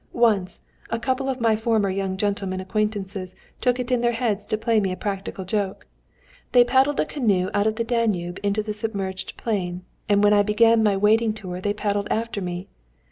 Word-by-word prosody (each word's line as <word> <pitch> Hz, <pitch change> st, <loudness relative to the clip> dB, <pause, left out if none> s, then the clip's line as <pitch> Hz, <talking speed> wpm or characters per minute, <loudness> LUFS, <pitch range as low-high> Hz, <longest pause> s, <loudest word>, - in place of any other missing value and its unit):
Once, 215 Hz, -6 st, +1 dB, 0.3 s
a 230 Hz, -, -1 dB
couple 260 Hz, +3 st, -1 dB
of 260 Hz, -1 st, -2 dB
my 225 Hz, -2 st, +3 dB
former 220 Hz, -3 st, +1 dB
young 190 Hz, 0 st, -2 dB
gentlemen 200 Hz, -2 st, -1 dB
acquaintances 195 Hz, -1 st, -3 dB, 0.3 s
took 250 Hz, 0 st, +2 dB
it 250 Hz, 0 st, -3 dB
into 250 Hz, -1 st, +2 dB
their 240 Hz, 0 st, +2 dB
heads 210 Hz, -4 st, -1 dB
to 215 Hz, -, 0 dB
play 225 Hz, 0 st, +2 dB
me 195 Hz, -3 st, 0 dB
a 185 Hz, -, -4 dB
practical 195 Hz, -1 st, -4 dB
joke. 195 Hz, 0 st, -2 dB, 0.7 s
They 245 Hz, -1 st, +8 dB
paddled 265 Hz, +3 st, +2 dB
a -, -, +3 dB
canoe 200 Hz, -10 st, 0 dB
out 205 Hz, +1 st, +2 dB
of 220 Hz, -, 0 dB
the 230 Hz, -, -1 dB
Danube 215 Hz, -7 st, -1 dB
into 205 Hz, +1 st, 0 dB
the 210 Hz, 0 st, -3 dB
submerged 200 Hz, -3 st, -4 dB
plain, 180 Hz, -5 st, -2 dB, 0.3 s
and 205 Hz, 0 st, +4 dB
when 205 Hz, 0 st, +6 dB
I 205 Hz, -, +5 dB
began 225 Hz, +2 st, +4 dB
my 205 Hz, -2 st, +3 dB
wading 215 Hz, +2 st, +3 dB
tour 185 Hz, -4 st, -6 dB
they 205 Hz, +1 st, 0 dB
paddled 205 Hz, -1 st, -1 dB
after 225 Hz, -2 st, -2 dB
me. 180 Hz, 0 st, -4 dB
210 Hz, 195 wpm, -23 LUFS, 195-230 Hz, 0.7 s, They